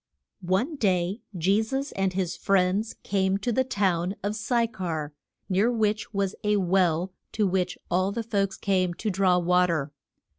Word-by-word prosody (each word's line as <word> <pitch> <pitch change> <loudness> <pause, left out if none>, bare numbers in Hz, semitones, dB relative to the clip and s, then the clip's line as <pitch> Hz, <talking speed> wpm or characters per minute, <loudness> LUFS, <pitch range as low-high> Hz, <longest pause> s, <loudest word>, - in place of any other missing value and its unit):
ONE 245 - +1
day 190 -1 +1 0.2
Je 195 +6 +3
sus 270 +5 -3
and 195 -1 -1
his 185 -2 -1
friends 195 +3 +1
came 190 -1 +1
to 220 +5 -2
the 260 +3 +2
town 190 -6 0
of 205 +1 -1
Sy 235 +2 +1
char, 160 -9 -4 0.3
near 200 +6 +2
which 220 -1 0
was 200 -1 -1
a 210 0 +2
well 180 -2 +2 0.2
to 215 - +1
which 180 -1 0
all 185 +2 +2
the 230 +2 -3
folks 200 -4 -1
came 185 -3 0
to 210 +3 -2
draw 185 -1 +3
wa 180 +1 +3
ter. 155 -4 -1
195 Hz, 170 wpm, -26 LUFS, 180-210 Hz, 0.3 s, Je